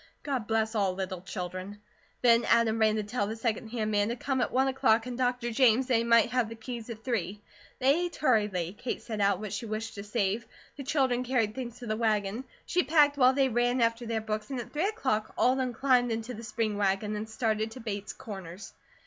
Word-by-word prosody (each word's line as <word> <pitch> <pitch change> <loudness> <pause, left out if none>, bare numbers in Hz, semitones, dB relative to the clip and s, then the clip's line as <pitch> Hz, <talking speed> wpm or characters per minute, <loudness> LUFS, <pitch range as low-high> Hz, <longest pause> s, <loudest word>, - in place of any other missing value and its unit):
God 260 -7 -2
bless 220 0 +1
all 195 -4 +1
little 185 -1 -4
children. 185 +1 -6 0.5
Then 235 -1 +6
Adam 230 -1 +3
ran 215 -1 +4
to 215 - -1
tell 205 0 -2
the 220 - -4
second 225 0 -2
hand 220 -2 -2
man 205 0 +2
to 235 - -1
come 260 +1 -1
at - - 0
one 265 +1 +2
o'clock 230 -4 +3
and 250 -1 -5
Dr. 245 -1 0
James 250 +1 +4
that 250 -2 +2
he 230 - +1
might 230 -1 +4
have 250 -3 +1
the 230 - -7
keys 235 0 -7
at 220 -1 -8
three. 210 -5 -2 0.4
They 280 +7 +3
ate 350 - -5
hurriedly. 205 - +1
Kate 250 - -4
set 220 -3 -4
out 200 -2 +3
what 215 -1 -5
she 220 +2 -4
wished 215 +1 -4
to 200 - -7
save; 210 +1 -1 0.3
the 280 - -7
children 260 -3 +1
carried 240 -4 +1
things 245 -2 -6
to 245 - -9
the 215 -1 -1
wagon; 215 +1 0 0.2
she 360 - +2
packed 295 -3 +4
while 260 -2 +5
they 270 0 +3
ran 245 +1 +1
after 230 0 +1
their 225 -1 -1
books, 215 +1 -4
and 265 -2 -3
at 235 - -8
three 315 +6 +1
o'clock 220 - -1
all 250 - +4
of 265 - 0
them 255 -1 0
climbed 245 0 +2
into 225 +2 -3
the 230 0 -8
spring 215 -1 -2
wagon, 205 +1 0
and 215 +1 -5
started 220 -1 -1
to 255 - -10
Bates 210 -3 -4
Corners. 190 -3 -9
225 Hz, 230 wpm, -29 LUFS, 210-250 Hz, 0.5 s, Then